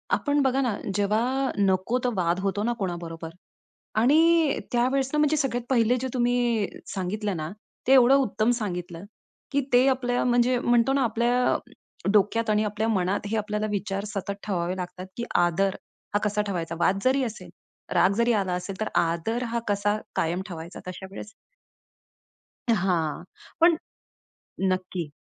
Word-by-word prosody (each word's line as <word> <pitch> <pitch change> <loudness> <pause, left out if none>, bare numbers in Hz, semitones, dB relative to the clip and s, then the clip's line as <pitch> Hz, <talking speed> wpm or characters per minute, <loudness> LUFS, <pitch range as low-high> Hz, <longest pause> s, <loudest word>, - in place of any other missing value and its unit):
आपण 290 -1 +1
बघा 265 0 +2
ना, 235 -6 0 0.2
जेव्हा 235 +7 +1
नको 195 +4 +2
तो 250 - +1
वाद 175 -1 +1
होतो 200 +1 -1
ना 240 +1 +1
कोणाबरोबर 170 -3 -4 0.7
आणि 315 +4 +4
त्यावेळेस 260 +2 +1
ना - - +1
म्हणजे 300 +1 +3
सगळ्यात 245 -4 -1
पहिले 245 -2 +3
जे 260 - -1
तुम्ही 240 -3 +1 0.3
सांगितलं 195 +1 -2
ना 155 0 -4 0.4
ते 265 - +6
एवढं 260 0 +7
उत्तम 220 -4 +2
सांगितलं, 180 -5 -5 0.5
की 280 0 +2
ते 250 +2 +6
आपल्या, 250 -2 +1
म्हणजे 245 0 +3
म्हणतो 240 +2 +3
ना 275 - +2
आपल्या 240 +2 +2 0.5
डोक्यात 215 +2 +2
आणि 210 0 +3
आपल्या 210 +1 -1
मनात 200 0 0
हे 225 - -1
आपल्याला 210 0 -1
विचार 200 0 -2
सतत 200 -1 -4
ठेवावे 180 -2 -1
लागतात, 180 0 -6
की 235 - -2
आदर 175 +3 +2 0.4
हा - - +4
कसा 210 0 +1
ठेवायचा? 170 -4 -3
वाद 190 +3 +2
जरी 260 +1 +3
असेल, 230 -3 -6 0.4
राग 195 - +4
जरी 235 +1 +3
आला 195 -4 0
असेल 180 +2 -4
तर - - 0
आदर 170 +8 0
हा 235 - +1
कसा 205 0 +1 0.2
कायम 170 +3 0
ठेवायचा 170 0 -8
तशा 185 +1 -7
वेळेस? 210 +2 -8 1.4
हां. 175 -5 0 0.4
पण 335 -1 +6 0.9
नक्की. 185 -3 -2
210 Hz, 150 wpm, -26 LUFS, 185-245 Hz, 1.4 s, एवढं